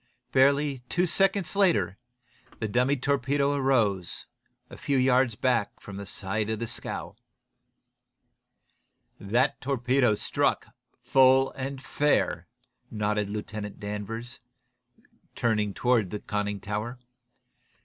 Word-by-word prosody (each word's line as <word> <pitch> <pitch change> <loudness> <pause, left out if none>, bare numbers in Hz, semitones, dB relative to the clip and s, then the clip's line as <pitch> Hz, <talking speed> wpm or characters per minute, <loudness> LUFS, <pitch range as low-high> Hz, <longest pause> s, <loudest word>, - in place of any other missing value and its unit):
Barely 140 +1 +3
two 180 0 +2
seconds 195 +1 +1
later 180 - +2 0.6
the - - -33
second 105 - -5
dummy 125 +4 +2
torpedo 140 +1 +1
rose, 105 - +1 0.4
a - - -11
few 140 - -1
yards 125 -2 +3
back 115 -3 0
from 100 -1 -9
the 100 -1 -7
side 105 +2 -2
of 110 - -1
the 115 - -3
scow. - - -6 2.0
"That 120 +8 +1
torpedo 125 -3 +2
struck, - - 0 0.3
full 130 +1 +5
and 135 0 -5
fair," 145 +2 0 0.4
nodded 105 -1 -1
Lieutenant 105 0 -6
Danvers, 105 +4 -5 1.0
turning 105 -3 +1
toward 115 -2 +1
the 105 - -4
conning 105 -1 -3
tower. 105 +4 -4
"Mr. 125 - -36
120 Hz, 115 wpm, -27 LUFS, 105-135 Hz, 2.0 s, full